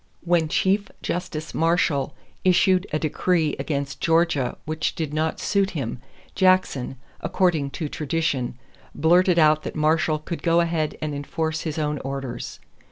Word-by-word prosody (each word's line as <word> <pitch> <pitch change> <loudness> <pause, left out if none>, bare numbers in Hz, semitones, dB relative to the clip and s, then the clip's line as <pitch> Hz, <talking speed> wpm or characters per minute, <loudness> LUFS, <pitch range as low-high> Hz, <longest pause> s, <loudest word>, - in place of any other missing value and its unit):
When 170 -2 +2
Chief 195 +5 +1
Justice 165 -3 -4
Marshall 160 -4 +1 0.3
issued 185 +1 +4
a 155 - +1
decree 160 0 +1
against 140 -2 -3
Georgia 165 -6 +2
which 155 +1 -2
did 155 -3 -3
not 155 +1 -1
suit 200 -1 +1
him, 120 -4 -3 0.3
Jackson, 185 -9 +2 0.2
according 165 -4 +1
to 155 - -2
tradition, 145 -5 -2 0.4
blurted 175 +3 +4
out 155 -1 +5
that - - -6
Marshall 155 0 +2
could 165 +3 -6
go 170 0 +3
ahead 165 -3 0
and 150 -1 -2
enforce 155 +2 -2
his 155 -2 -4
own 150 -2 -1
orders. 135 -3 -5
160 Hz, 140 wpm, -24 LUFS, 150-170 Hz, 0.4 s, out